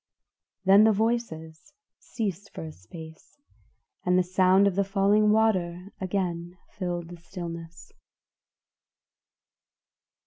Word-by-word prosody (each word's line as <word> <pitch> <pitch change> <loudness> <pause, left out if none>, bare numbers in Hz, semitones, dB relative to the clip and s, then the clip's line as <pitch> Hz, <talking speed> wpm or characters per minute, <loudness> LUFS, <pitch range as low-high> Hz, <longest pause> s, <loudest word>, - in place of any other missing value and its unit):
Then 195 +2 +7
the 220 - +6
voices 200 -8 -2 0.3
ceased 200 -3 -4
for 80 - -5
a 80 - -7
space, 160 - -13 0.7
and 180 0 +3
the 185 - +4
sound 185 +2 +4
of 200 - +2
the 200 +2 +1
falling 200 +2 +3
water 190 -4 +1
again 180 -2 -3
filled 175 -3 -4
the 175 - -9
stillness. 170 -1 -8
185 Hz, 105 wpm, -27 LUFS, 170-200 Hz, 0.7 s, Then